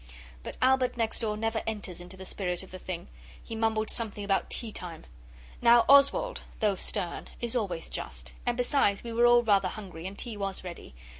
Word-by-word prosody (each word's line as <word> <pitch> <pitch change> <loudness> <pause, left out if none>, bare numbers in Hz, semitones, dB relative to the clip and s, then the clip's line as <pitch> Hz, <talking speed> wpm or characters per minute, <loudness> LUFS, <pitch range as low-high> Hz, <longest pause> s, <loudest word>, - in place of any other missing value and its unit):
But - - -7
Albert 260 -1 +3
next 225 -1 +1
door 215 -2 -1
never 225 +1 -1
enters 205 -5 -4
into 180 +2 -10
the 190 - -8
spirit 180 -2 -1
of 190 - -14
a 185 - -7
thing. 180 0 -6 0.4
He 225 - -6
mumbled 220 -1 +1
something 210 -3 0
about 195 -1 0
tea 230 -2 -2
time. 170 -5 -7 0.6
Now 235 0 +6
Oswald, 280 - +5 0.2
though 210 -2 +3
stern, 180 -2 -4
is 235 0 -3
always 185 -8 -1
just, - - -5
and 245 0 -1
besides 245 -5 +2
we 235 -1 -5
were 240 +1 +5
all 240 0 +6
rather 200 -4 +4
hungry, 185 -4 -7
and 195 +1 -8
tea 230 -4 -4
was 195 -2 -2
ready. 175 - -9
215 Hz, 195 wpm, -29 LUFS, 190-235 Hz, 0.6 s, Now